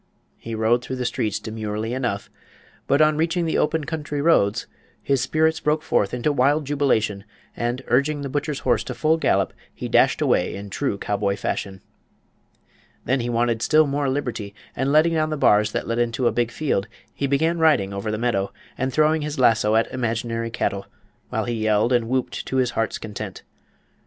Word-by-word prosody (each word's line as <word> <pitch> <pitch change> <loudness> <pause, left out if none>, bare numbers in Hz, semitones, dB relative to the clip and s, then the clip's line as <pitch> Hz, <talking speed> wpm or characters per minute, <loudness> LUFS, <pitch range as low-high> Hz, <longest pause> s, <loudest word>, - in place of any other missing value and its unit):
He 115 -1 -6
rode 115 +2 +2
through 130 - -4
the 125 -1 -3
streets 110 -3 -1
demurely 110 +1 -4
enough, 125 -6 -3 0.6
but 140 +2 +3
on 155 0 +3
reaching 170 +2 +1
the 160 - 0
open 155 +1 +1
country 150 -1 -4
roads 115 -9 +3 0.3
his 135 -3 0
spirits 160 +4 +1
broke 150 0 0
forth 105 -10 +1
into 125 +4 0
wild 145 +3 +2
jubilation, 110 -8 0 0.3
and, 120 +2 -2
urging 140 +4 +1
the - - -3
butcher's 145 +1 -2
horse 120 -3 +1
to - - -5
full 160 +1 +2
gallop, - - +1 0.2
he - - -6
dashed - - +3
away 90 - +1
in 100 0 -8
true 135 -5 -1
cowboy 100 -1 -1
fashion. 95 -1 -4 1.2
Then 130 +3 +1
he 120 0 -2
wanted 120 -1 +1
still 155 +3 +4
more 140 -1 -1
liberty, 120 -7 -3 0.2
and 135 +2 0
letting 155 +3 +4
down 155 -1 +1
the 155 - -2
bars 105 -4 +4
that - - -2
led 115 +1 -1
into 120 +1 0
a - - +4
big 120 -1 0
field 120 -8 -1 0.3
he 140 - -2
began 160 +5 +1
riding 145 -12 +3
over 100 +2 -3
the 110 - -1
meadow 105 -4 0 0.3
and 130 0 0
throwing 155 +2 +3
his 150 0 -4
lasso 110 -4 +3
at 115 - +4
imaginary 115 -1 -2
cattle, 100 -3 -2 0.4
while - - -1
he 120 - -2
yelled 110 +1 +2
and 120 -2 +1
whooped 130 0 -2
to 130 - -1
his 125 -2 +2
heart's 115 -1 -1
content. 105 -2 -7
125 Hz, 185 wpm, -23 LUFS, 110-145 Hz, 1.2 s, still